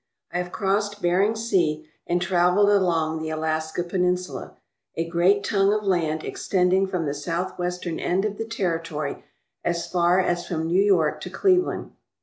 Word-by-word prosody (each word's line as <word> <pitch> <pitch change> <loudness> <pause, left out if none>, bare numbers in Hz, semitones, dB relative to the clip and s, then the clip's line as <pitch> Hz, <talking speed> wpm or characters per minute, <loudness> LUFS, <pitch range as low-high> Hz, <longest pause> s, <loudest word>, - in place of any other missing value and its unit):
I 175 - 0
have 180 0 -4
crossed 205 +1 -1
Bering 190 +4 +2
Sea 170 -9 0 0.2
and 175 +1 +1
travelled 180 +2 +3
along 165 -5 +1
the 160 - -3
Alaska 155 +1 -2
Peninsula, 180 0 -2 0.4
a 165 0 -2
great 180 +4 +3
tongue 200 -1 +2
of 210 0 0
land 165 -5 0
extending 190 +1 +1
from 180 -4 -2
the 140 - -1
southwestern 175 +2 -3
end 190 +3 0
of 205 -1 -3
the 225 - -3
territory 165 -8 -3 0.4
as 170 0 -1
far 175 0 +2
as 175 -1 0
from 160 -2 -2
New 175 +4 +3
York 160 -7 +2
to 180 - -6
Cleveland. 365 - +1
180 Hz, 155 wpm, -24 LUFS, 165-195 Hz, 0.4 s, travelled